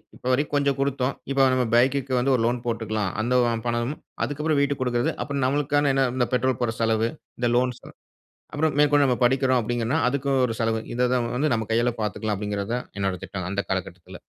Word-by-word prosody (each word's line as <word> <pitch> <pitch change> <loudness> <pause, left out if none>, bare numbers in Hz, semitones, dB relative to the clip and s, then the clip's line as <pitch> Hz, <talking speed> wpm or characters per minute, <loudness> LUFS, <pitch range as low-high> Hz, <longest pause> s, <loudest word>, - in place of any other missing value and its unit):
இப்ப - - -18
வரைக்கும் 145 +3 0
கொஞ்சம் 140 -1 +1
குடுத்தோம், 135 -1 0 0.2
இப்ப 135 - 0
நம்ம 125 -1 +2
பைக்குக்கு 130 +2 +2
வந்து 135 +2 +2
ஒரு 120 - 0
லோன் 120 +1 0
போட்டுக்கலாம், 110 -4 -2
அந்த 120 +3 0 0.2
ஓம் 115 -1 -2
பணமும், 120 +5 -2 0.2
அதுக்கப்புறம் 150 +1 0
வீட்டுக்கு 140 -1 0
குடுக்குறது, 120 -1 0
அப்புறம் 140 -2 -2
நம்மளுக்கான 145 +1 +1
என்ன 135 0 +3
இந்த 125 -2 +1
பெட்ரோல் 130 0 +1
போடுற 115 -2 0
செலவு, 115 0 +2 0.3
இந்த 120 -1 +1
லோன் 125 0 +1
செலவு, - - -15 0.6
அப்றம் 150 0 +1
மேற்கொண்டு 145 -1 +5
நம்ம 125 -2 0
படிக்கிறோம் 130 0 +3
அப்டிங்கன்னா, 120 +6 -1
அதுக்கு 140 +1 -1
ஒரு 115 -2 -3
செலவு 115 -1 0
இத 125 0 +2
தான் 120 -2 0
வந்து 145 -2 +1
நம்ம 110 -1 -3
கையால 120 +1 +2
பார்த்துக்கலாம் 105 0 -2
அப்டிங்கிறத 105 +1 -3
தான் 125 - -5
என்னோட 95 -1 0
திட்டம் 95 -2 -5
அந்த 100 0 -1
காலகட்டத்தில. 90 -2 -5
125 Hz, 195 wpm, -24 LUFS, 115-140 Hz, 0.6 s, மேற்கொண்டு